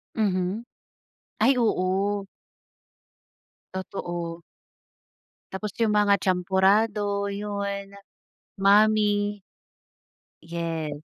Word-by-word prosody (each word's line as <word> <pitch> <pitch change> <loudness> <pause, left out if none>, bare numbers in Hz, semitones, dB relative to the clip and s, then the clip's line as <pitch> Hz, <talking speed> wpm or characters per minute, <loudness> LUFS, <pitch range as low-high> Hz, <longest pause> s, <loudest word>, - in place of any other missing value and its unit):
Mhm. 200 +1 0 0.7
Ay, 275 - +4
oo. 200 -2 +1 1.5
Totoo. 175 -3 -5 1.1
Tapos 195 +1 -5
yung 220 - +2
mga 205 -1 +4
champorado, 200 +3 +2
yun, 200 -1 -4 0.7
mami. 205 0 +3 1.0
Yes. 165 -3 -4
200 Hz, 60 wpm, -25 LUFS, 185-205 Hz, 1.5 s, Ay